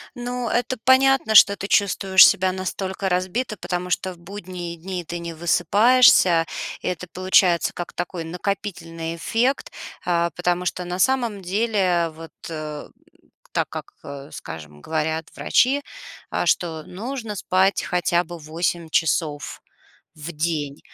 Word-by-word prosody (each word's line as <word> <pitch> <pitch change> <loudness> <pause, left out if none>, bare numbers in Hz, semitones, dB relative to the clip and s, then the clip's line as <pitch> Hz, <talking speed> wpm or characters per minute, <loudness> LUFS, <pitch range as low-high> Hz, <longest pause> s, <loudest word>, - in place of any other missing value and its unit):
Ну, 245 0 -4
это 245 +2 -1
понятно, 260 -3 +4
что 200 -1 +8
ты 195 - -5
чувствуешь 195 -2 +6
себя 190 -2 +2
настолько 190 +1 -3
разбито, 190 +6 -1
потому 180 0 -4
что 185 +1 -1
в 175 - -19
будние 180 -2 -7
дни 180 +1 -5
ты 175 +2 -6
не 170 -1 -6
высыпаешься. 180 +1 +4 0.4
Это 180 0 -3
получается 185 -2 +3
как 175 - -6
такой 175 -1 -4
накопительный 170 -2 -4
эффект, 250 - 0 0.3
э, 170 -1 +1
потому 175 0 0
что 180 +1 -2
на 180 +1 -4
самом 235 -4 +1
деле, 185 -3 +1
вот, 165 0 -11 1.2
так - - 0
как, - - -8
э, 140 +1 -9
скажем, 75 -3 -9
говорят 160 0 -2
врачи, 275 +3 +2 0.5
э, - - -1
что 160 -3 0
нужно 225 +2 -6
спать 190 0 +1
хотя 175 -1 +1
бы 175 0 -9
8 165 +2 -3
часов 155 -2 -1 0.6
в 155 +2 -7
день. 150 -3 -2
180 Hz, 130 wpm, -22 LUFS, 170-200 Hz, 1.2 s, что